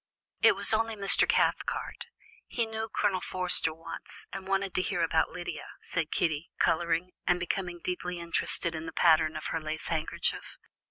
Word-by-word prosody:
"It - - +6
was - - +2
only 225 0 +1
Mr. 200 -1 +5
Cathcart; - - 0 0.4
he 235 - -1
knew 220 0 -5
Colonel 190 -2 0
Forster 180 -3 +4
once, 165 +1 -8
and 190 0 -7
wanted 195 -1 0
to - - +1
hear 180 -2 -1
about 160 -1 +2
Lydia," 175 +1 -6 0.2
said 165 -3 -2
Kitty, 160 -1 -1
colouring 170 +2 +1 0.2
and 180 0 +3
becoming 175 0 -3
deeply 180 0 -3
interested 170 0 +1
in 160 0 -6
the 160 - -7
pattern 160 -2 +4
of - - -8
her 165 - -2
lace 155 0 -5
handkerchief. 160 -1 -2
175 Hz, 165 wpm, -29 LUFS, 165-195 Hz, 0.4 s, It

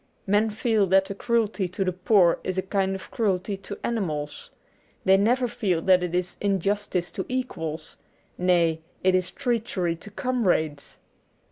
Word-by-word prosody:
Men 205 +3 +3
feel 215 -1 +1
that 190 +1 +4
the 200 - -5
cruelty 220 -2 0
to 185 +2 -2
the 185 - +1
poor 180 -1 +4
is 185 0 -3
a 190 - +1
kind 195 0 0
of 190 - -9
cruelty 200 -2 0
to 200 +1 -8
animals. 155 -11 -3 0.6
They 190 - +6
never 245 +6 +2
feel 220 -8 0
that 185 -1 +5
it 180 -1 -2
is 180 0 -2
injustice 195 -3 0
to 190 - -4
equals; 175 -12 -4 0.4
nay, 170 -3 +2 0.2
it 185 0 +4
is 185 -1 +1
treachery 225 -10 -1
to 210 - -11
comrades. 190 - -1
190 Hz, 155 wpm, -25 LUFS, 180-215 Hz, 0.6 s, They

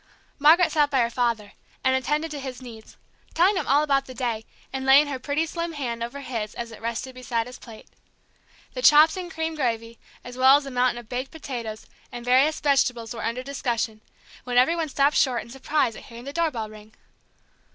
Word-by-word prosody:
Margaret 320 +5 +6
sat 295 -2 +3
by 270 -3 +2
her 235 0 0
father, 230 -4 -1 0.3
and 260 0 +3
attended 300 +4 -1
to 295 - -5
his 260 -2 -6
needs, 230 -4 -12 0.4
telling 370 +5 +4
him 370 - -2
all 285 +3 +4
about 275 -2 +1
the 255 - -9
day, 230 -3 -2 0.3
and 265 0 -3
laying 270 +3 +7
her 280 -3 -4
pretty 290 +4 -1
slim 335 +1 -4
hand 240 -6 -4
over 240 +5 -5
his 225 -5 -5
as 235 -1 -6
it 225 - -12
rested 235 +3 -4
beside 245 -2 -2
his 250 +1 -11
plate. 225 -3 -13 0.9
The - - -4
chops 310 -4 +7
and 365 -2 -5
cream 320 0 -3
gravy, 230 -5 -3 0.2
as 245 0 -9
well 260 +1 +7
as 290 - -5
a 275 - -7
mountain 250 -1 +1
of 240 -2 -9
baked 255 +3 -4
potatoes, 235 -8 -6 0.3
and 240 -1 -8
various 265 +5 +3
vegetables, 255 -5 +1
were 230 - -6
under 235 +3 -2
discussion, 240 -5 -3 0.4
when 245 -1 -2
every 260 +7 +5
one 325 -2 -2
stopped 280 +1 +2
short 250 -4 +2
in 235 - -14
surprise 270 -2 0
at - - -11
hearing 235 0 -11
the 280 +2 -7
doorbell 300 -10 -1
ring. 215 0 -14
255 Hz, 205 wpm, -25 LUFS, 235-290 Hz, 0.9 s, laying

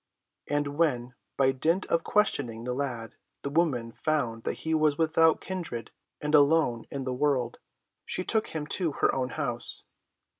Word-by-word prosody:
And 145 0 -1
when, 125 -7 +1 0.2
by 135 -1 +4
dint 160 +8 +1
of 165 - +1
questioning 125 - +1
the 125 +1 -2
lad, 125 -4 -3 0.3
the 140 - -3
woman 140 -8 +1
found 120 -5 -1
that - - 0
he 160 - +1
was 155 -2 +3
without 160 0 +3
kindred 165 - -5 0.3
and 150 +1 -3
alone 145 -5 +4
in 140 -1 -4
the 130 -1 -2
world, 130 -3 0 0.4
she 185 - -3
took 220 +3 +2
him 155 -2 -4
to 165 0 0
her - - +2
own 130 -1 -1
house. 125 -6 0
145 Hz, 160 wpm, -28 LUFS, 125-160 Hz, 0.4 s, by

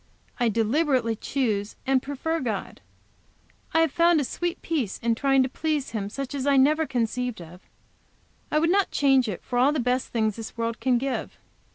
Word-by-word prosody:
I 240 -1 +3
deliberately 230 +1 +1
choose 215 -5 -2
and 265 -1 +2
prefer 285 +5 -2
God. 220 -8 -4 0.9
I 325 - +3
have 325 -3 +2
found 340 0 +4
a - - +1
sweet 345 +6 -3
peace 275 - -2
in 235 0 0
trying 270 +2 +3
to - - 0
please 300 +1 -2
Him 205 -3 -3
such 275 +4 -5
as 280 -1 -3
I 280 -1 +4
never 305 +4 +4
conceived 245 -2 -2
of. 175 +2 -12 0.9
I - - +1
would 330 +2 +3
not 395 0 +3
change 270 -3 +3
it 185 - -6
for 245 - -1
all 265 +4 +5
the 300 - -1
best 250 +1 0
things 220 -2 -1
this 225 0 -8
world 230 -1 -2
can 255 -2 +2
give. 265 +2 -3
260 Hz, 190 wpm, -25 LUFS, 230-290 Hz, 0.9 s, all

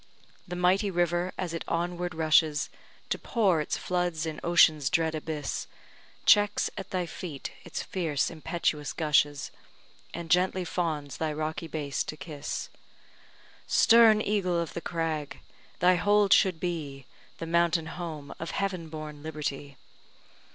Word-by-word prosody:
The 180 - -5
mighty 185 +3 +2
river, 175 0 0
as 175 -3 -3
it 165 - -3
onward 175 0 -2
rushes 155 -1 +3 0.4
To - - -1
pour 195 - +2
its 150 - -2
floods 175 -3 -1
in 155 -1 -4
ocean's 155 -5 +5
dread 160 0 +1
abyss, 155 -2 -4 0.6
Checks 205 0 +4
at 195 -2 -7
thy 180 -2 -1
feet 160 -4 -7
its - - -5
fierce 160 -7 -1
impetuous 155 -2 -2
gushes, 145 -3 +1 0.6
And 170 -1 -6
gently 180 +1 +2
fawns 155 -6 -2
thy 160 -1 -1
rocky 155 +2 -3
base 145 -3 -2
to 155 - -6
kiss. 150 -3 -5 1.0
Stern 225 -2 +6
eagle 185 -4 +1
of 165 -4 -3
the 170 - -4
crag! 160 -4 -3 0.4
thy 180 +1 +5
hold 205 +1 +4
should 185 -4 +4
be 150 -7 -4 0.3
The 165 - -5
mountain 170 0 +2
home 160 -4 -6
of 165 - -4
heaven 185 -5 -2
born 155 -2 -7
liberty! 145 -3 -5
165 Hz, 135 wpm, -28 LUFS, 155-180 Hz, 1.0 s, Stern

